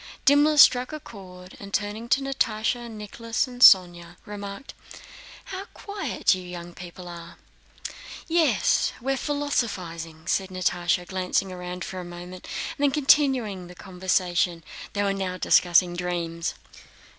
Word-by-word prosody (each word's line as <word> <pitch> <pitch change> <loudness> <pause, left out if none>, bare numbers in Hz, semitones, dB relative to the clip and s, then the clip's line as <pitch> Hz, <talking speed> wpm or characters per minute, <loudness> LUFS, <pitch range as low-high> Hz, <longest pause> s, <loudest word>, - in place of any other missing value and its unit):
Dimmler 295 +2 +5
struck 255 -2 +6
a 310 - -5
chord 185 -8 -12
and, 200 0 -9
turning 215 +3 -3
to 275 - +3
Natásha, 240 -3 -1
Nicholas, 225 +2 -3
and 245 -1 -10
Sónya, 175 -5 +6
remarked: 205 +4 -8 0.7
"How 385 +1 -6
quiet 405 - 0
you 185 - -4
young 175 -1 -8
people 180 +1 -10
are!" 170 -1 -10 0.9
"Yes, 325 - +2
we're 270 +3 -1
philosophizing," 185 - -3
said 190 +2 0
Natásha, 180 -1 0
glancing 185 0 -1
round 180 0 -6
for 185 - -6
a - - -5
moment 175 +1 -10 0.3
and - - -1
then - - +5
continuing 265 -10 +2
the 180 - -12
conversation. 180 -2 -1 0.3
They 205 - 0
were 200 -1 +1
now 190 -2 -3
discussing 175 0 +4
dreams. 170 -2 -3
190 Hz, 135 wpm, -25 LUFS, 180-245 Hz, 0.9 s, struck